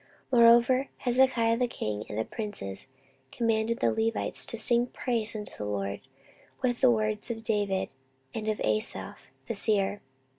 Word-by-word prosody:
14:029:030 245 - +5
Moreover 240 +3 +5
Hezekiah 245 -2 +2
the 250 0 +1
king 105 - -4
and 105 - -5
the 110 - -1
princes 205 - -6 0.4
commanded 230 0 0
the - - +3
Levites 225 0 0
to 230 - 0
sing 235 +2 +3
praise 230 -4 -2
unto 210 -1 -5
the 105 - -6
LORD 100 -1 -3 0.6
with 245 -1 0
the 260 - +6
words 215 -2 0
of 225 -1 -5
David, 205 -3 -1 0.4
and 215 -1 -5
of 215 -1 -1
Asaph 110 0 -1 0.2
the - - -3
seer. 205 -1 +1
220 Hz, 155 wpm, -28 LUFS, 200-235 Hz, 0.6 s, the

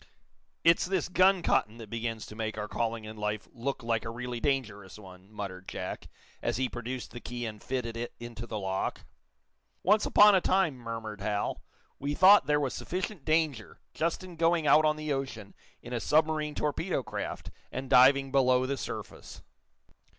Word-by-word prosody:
"It's 165 +1 +4
this 185 -3 -1
gun 185 0 +4
cotton 115 -7 +1
that 110 -3 -10
begins 115 -1 -3
to 105 - -11
make 110 -1 -3
our 105 0 -3
calling 115 0 -2
in 110 0 -9
life 105 0 -3
look 130 +1 -4
like 115 -1 0
a - - -5
really 120 +1 -5
dangerous 110 -8 -2
one," 95 -1 -14
muttered 95 -3 -7
Jack, - - -5 0.3
as 120 -2 -1
he 130 0 +1
produced 125 +1 -6
the 120 - -8
key 120 0 -5
and 105 -2 -6
fitted 125 -3 -3
it 120 +1 -5
into 120 0 -7
the 110 - -4
lock. 95 -1 -3 0.8
"Once 210 +4 +4
upon 210 0 +7
a 190 - +4
time," 185 -5 +2
murmured 115 -3 -6
Hal, 105 0 -2 0.4
"we 145 +1 -2
thought 195 +4 +7
there 150 0 +3
was 140 -3 -1
sufficient 180 -3 -4
danger, 155 -7 0
just 165 +3 -1
in 180 -2 -10
going 165 -1 +2
out 150 +2 +6
on 155 0 +3
the 155 -1 -2
ocean 130 -7 -5 0.3
in - - -7
a 120 - 0
submarine 155 +1 +1
torpedo 150 0 -1
craft, 120 - -5 0.2
and 130 +1 -5
diving 135 +1 +6
below 130 -2 +3
the 140 +1 -2
surface." - - -7
125 Hz, 180 wpm, -29 LUFS, 110-155 Hz, 0.8 s, upon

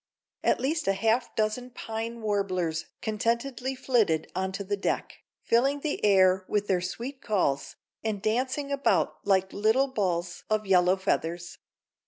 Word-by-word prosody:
At - - +3
least 305 +1 -1
half 220 +5 +2
a - - -29
dozen 220 +3 -1
pine 230 -1 -5
warblers 185 -6 -1 0.2
contentedly 235 +4 -1
flitted 225 - +1
onto 190 +1 -2
the 205 +1 -1
deck, 200 - -2 0.2
filling 275 +5 +2
the 300 -1 -3
air 190 -2 +5
with 205 -1 0
their 185 -3 +1
sweet 240 +9 -5
calls, 160 -10 0 0.3
and 215 -2 -1
dancing 255 +7 -1
about 280 0 +1
like 190 -1 +2
little 220 +6 +3
balls 180 -7 -2
of 215 0 +1
yellow 185 -1 +4
feathers. 175 -2 -2
210 Hz, 140 wpm, -28 LUFS, 190-245 Hz, 0.3 s, air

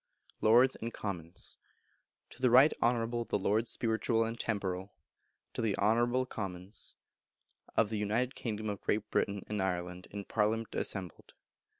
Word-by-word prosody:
Lords 120 +4 +6
and 115 +1 -5
Commons. 90 -5 -6 0.7
To - - -13
the 130 - +5
Right 130 +6 +7
Honourable 120 0 +1
the - - 0
Lords 110 +4 +1
Spiritual 115 0 +1
and 115 +1 -4
Temporal 95 -3 -2 0.6
(To - - -2
the 110 -3 +1
Honourable 120 +4 +3
the - - -2
Commons) 95 -3 -6 0.8
of 110 - +4
the 110 -1 -2
United 115 +5 0
Kingdom 110 -2 -4
of 100 -2 -3
Great 105 0 -1
Britain 100 -1 0
and 105 -2 -2
Ireland, 90 -1 -2
in 100 -1 -6
Parliament 110 +1 0
assembled. 95 -4 -3
110 Hz, 150 wpm, -32 LUFS, 100-115 Hz, 0.8 s, Right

